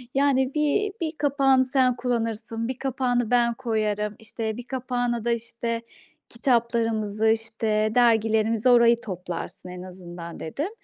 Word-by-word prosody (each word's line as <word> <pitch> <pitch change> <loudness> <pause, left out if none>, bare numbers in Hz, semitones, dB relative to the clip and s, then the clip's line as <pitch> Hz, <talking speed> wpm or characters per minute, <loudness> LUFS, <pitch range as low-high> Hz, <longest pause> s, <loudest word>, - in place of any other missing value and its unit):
Yani, 270 -1 +2
bir 305 +8 +1
bir 320 -2 -1
kapağını 275 -2 +3
sen 255 -1 +2
kullanırsın, 230 -2 -2
1 255 0 -4
kapağını 245 -3 0
ben 240 -1 +3
koyarım, 215 -2 -1
işte, 220 0 -4
1 245 - -6
kapağına 245 -3 -2
da, 240 - +2
işte, 230 0 -3 0.5
kitaplarımızı, 230 -3 0
işte, 220 -1 +1
dergilerimizi. 225 -1 +3
Orayı 235 -1 +6
toplarsın 180 -2 -6
en 180 0 -8
azından." 175 -2 -9
dedim. 280 - -3
230 Hz, 125 wpm, -25 LUFS, 215-255 Hz, 0.5 s, Orayı